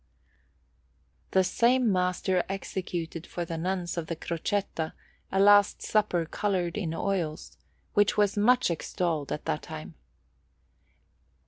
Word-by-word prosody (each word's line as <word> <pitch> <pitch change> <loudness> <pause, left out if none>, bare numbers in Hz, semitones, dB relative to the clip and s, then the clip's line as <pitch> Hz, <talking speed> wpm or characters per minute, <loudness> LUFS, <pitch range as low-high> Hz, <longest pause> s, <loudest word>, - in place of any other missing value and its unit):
The 190 - +4
same 240 +4 +3
master 180 0 +1
executed 175 -4 -4
for 175 - -4
the 165 - -4
Nuns 175 +1 -2
of 160 - -5
the 165 - -3
Crocetta 170 0 -2 0.4
a 195 - +1
Last 205 0 +5
Supper 205 -6 +1
coloured 180 -1 -1
in 170 -6 -2
oils, 160 - -2 0.4
which 205 0 +3
was 205 -1 +3
much 245 0 +4
extolled 165 -2 -2
at 150 - -4
that 75 - -1
time. 80 +1 -8
180 Hz, 120 wpm, -28 LUFS, 165-205 Hz, 0.4 s, Last